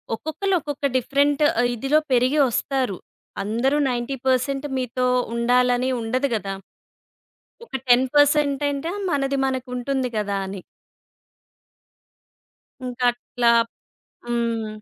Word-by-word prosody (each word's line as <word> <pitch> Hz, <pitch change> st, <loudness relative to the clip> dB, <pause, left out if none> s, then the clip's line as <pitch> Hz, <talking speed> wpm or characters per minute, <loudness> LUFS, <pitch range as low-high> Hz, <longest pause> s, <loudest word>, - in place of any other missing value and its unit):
ఒక్కొక్కళ్ళు 370 Hz, -, -2 dB
ఒక్కొక్క 290 Hz, -2 st, -5 dB
డిఫరెంట్ 280 Hz, +3 st, +1 dB
ఆహ్, 245 Hz, -7 st, +1 dB
ఇదిలో 275 Hz, +6 st, +2 dB
పెరిగి 255 Hz, +4 st, +3 dB
వస్తారు. 255 Hz, -4 st, -1 dB, 0.5 s
అందరూ 235 Hz, +7 st, +1 dB
90% 260 Hz, +2 st, -1 dB
మీతో 255 Hz, 0 st, -1 dB, 0.3 s
ఉండాలని 245 Hz, +1 st, +2 dB
ఉండదు 255 Hz, +5 st, 0 dB
గదా! 195 Hz, -2 st, -3 dB, 1.1 s
ఒక -, -, -27 dB, 0.2 s
10% 280 Hz, +3 st, +4 dB
అంట 280 Hz, +2 st, -4 dB, 0.3 s
మనది 275 Hz, -1 st, 0 dB
మనకుంటుంది 255 Hz, 0 st, -2 dB
గదా! 205 Hz, -1 st, -1 dB
అని. 190 Hz, 0 st, -6 dB, 2.3 s
ఇంకట్లా 245 Hz, -1 st, +1 dB, 0.7 s
హ్మ్. 235 Hz, -2 st, -1 dB
255 Hz, 90 wpm, -23 LUFS, 240-275 Hz, 2.3 s, 10